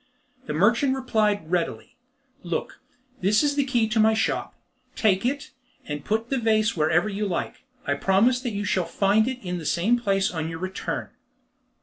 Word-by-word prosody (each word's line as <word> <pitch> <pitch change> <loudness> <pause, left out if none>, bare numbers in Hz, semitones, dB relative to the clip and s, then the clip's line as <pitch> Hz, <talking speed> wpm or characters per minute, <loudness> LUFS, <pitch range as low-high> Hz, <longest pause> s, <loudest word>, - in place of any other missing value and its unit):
The - - -2
merchant 235 - +3
replied 210 -9 0
readily, 175 -2 -2 0.5
"Look, 170 -2 -4 0.4
this 210 +6 +3
is 290 -1 +2
the 285 0 +1
key 245 -4 +2
of 220 0 +1
my 220 0 +4
shop: - - -1 0.4
take 200 0 +2
it, 285 +2 -3 0.3
and 145 -1 -5
put 225 +3 -2
the 270 - +1
vase 220 -1 +2
wherever 160 +4 +2
you 210 0 -2
like. 180 - -4 0.2
I 145 - +1
promise 200 - +2
that 250 - -2
you 205 -2 -3
shall 185 -3 +1
find 205 +5 +2
it 260 -1 -2
in 180 0 -2
the - - -8
same 180 +10 +1
place 195 -4 +1
on 160 -2 -3
your 165 - -5
return." 185 +2 -4
210 Hz, 180 wpm, -25 LUFS, 180-235 Hz, 0.5 s, my